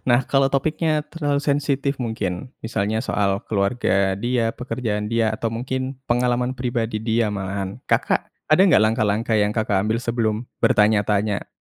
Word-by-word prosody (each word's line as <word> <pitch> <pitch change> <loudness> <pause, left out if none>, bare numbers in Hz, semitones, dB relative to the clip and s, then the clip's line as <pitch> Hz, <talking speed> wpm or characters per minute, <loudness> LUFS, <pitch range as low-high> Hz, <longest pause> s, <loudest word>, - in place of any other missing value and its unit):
Nah, 120 0 +5
kalau 135 -1 +3
topiknya 155 +2 +1
terlalu 145 -3 -1
sensitif 140 -1 0
mungkin, 110 -3 -4
misalnya 110 -1 -1
soal 100 -5 0
keluarga 100 -2 +1
dia, 115 +1 0
pekerjaan 115 -4 -3
dia, 115 -1 +1
atau 115 +1 -2
mungkin 130 +3 -3
pengalaman 125 +1 +1
pribadi 120 -3 -2
dia 115 0 +1
malahan, 95 -1 -4
Kakak - - +1 0.2
ada 155 +4 +3
nggak 190 - +6
langkah-langkah 110 0 +1
yang 105 -1 +2
Kakak 110 -3 +1
ambil 110 +3 0
sebelum 115 -1 -1 0.2
bertanya-tanya? 105 -1 +2
115 Hz, 140 wpm, -22 LUFS, 105-130 Hz, 0.2 s, nggak